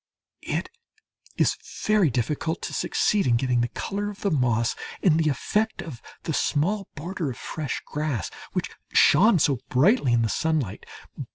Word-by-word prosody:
It -, -, -3 dB, 0.7 s
is -, -, +2 dB, 0.3 s
very 210 Hz, -6 st, +4 dB
difficult 145 Hz, +7 st, -2 dB
to -, -, -4 dB
succeed 205 Hz, -6 st, +1 dB
in 120 Hz, -, +4 dB
getting 125 Hz, -1 st, +1 dB
the 120 Hz, -, +1 dB
colour 205 Hz, +10 st, -3 dB
of 205 Hz, -, -10 dB
the 200 Hz, -, 0 dB
moss 120 Hz, -5 st, +1 dB, 0.3 s
and 165 Hz, -4 st, +4 dB
the 155 Hz, -1 st, +2 dB
effect 215 Hz, -, 0 dB
of 135 Hz, -8 st, -9 dB, 0.2 s
the 160 Hz, -, -2 dB
small 185 Hz, +9 st, 0 dB
border 165 Hz, 0 st, -4 dB
of 125 Hz, -, -6 dB
fresh 155 Hz, -3 st, -4 dB
grass 145 Hz, -, -3 dB, 0.2 s
which -, -, -2 dB, 0.2 s
shone 215 Hz, -1 st, +6 dB
so 140 Hz, -5 st, +2 dB
brightly 145 Hz, -, +3 dB
in 120 Hz, -1 st, +3 dB
the -, -, +2 dB
sunlight. 140 Hz, -, -1 dB
155 Hz, 160 wpm, -25 LUFS, 125-190 Hz, 0.7 s, shone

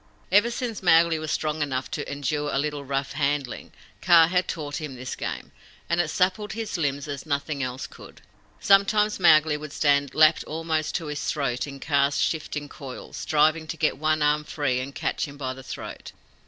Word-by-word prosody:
Ever 205 Hz, +5 st, +5 dB
since 240 Hz, -2 st, -4 dB
Mowgli 165 Hz, -2 st, +4 dB
was 155 Hz, -1 st, -4 dB
strong 155 Hz, 0 st, -1 dB
enough 130 Hz, -3 st, -2 dB
to 145 Hz, -, -4 dB
endure 145 Hz, +1 st, -2 dB
a -, -, 0 dB
little 145 Hz, 0 st, -2 dB
rough 135 Hz, 0 st, -2 dB
handling, 140 Hz, -3 st, -2 dB, 0.3 s
Kaa 170 Hz, -2 st, +7 dB
had 180 Hz, 0 st, +1 dB
taught 150 Hz, -4 st, -4 dB
him 150 Hz, -4 st, -6 dB
this 130 Hz, +1 st, -6 dB
game, -, -, -5 dB, 0.4 s
and 170 Hz, +1 st, +2 dB
it 165 Hz, -, -2 dB
suppled 190 Hz, +5 st, 0 dB
his 225 Hz, -1 st, -4 dB
limbs 145 Hz, -3 st, -1 dB
as 140 Hz, -2 st, -5 dB
nothing 140 Hz, 0 st, -2 dB
else 130 Hz, 0 st, -3 dB
could. -, -, -13 dB, 0.4 s
Sometimes 210 Hz, +1 st, +3 dB
Mowgli 155 Hz, -3 st, +5 dB
would 150 Hz, 0 st, -8 dB
stand 140 Hz, -2 st, +1 dB
lapped 155 Hz, +1 st, +5 dB
almost 160 Hz, -1 st, -2 dB
to 165 Hz, -, -2 dB
his 150 Hz, -1 st, -4 dB
throat 140 Hz, -3 st, -1 dB
in 140 Hz, -1 st, -8 dB
Kaa's 140 Hz, -1 st, +1 dB
shifting 150 Hz, -2 st, -2 dB
coils, 135 Hz, -3 st, -9 dB
striving 155 Hz, 0 st, +2 dB
to 165 Hz, -, -5 dB
get 150 Hz, -2 st, 0 dB
one 155 Hz, 0 st, +1 dB
arm 150 Hz, +1 st, +2 dB
free 145 Hz, -5 st, -1 dB
and 135 Hz, +2 st, -6 dB
catch -, -, -2 dB
him 140 Hz, 0 st, -11 dB
by 130 Hz, -2 st, -3 dB
the 130 Hz, -, -11 dB
throat. 130 Hz, -, -8 dB
150 Hz, 190 wpm, -25 LUFS, 140-165 Hz, 0.4 s, Kaa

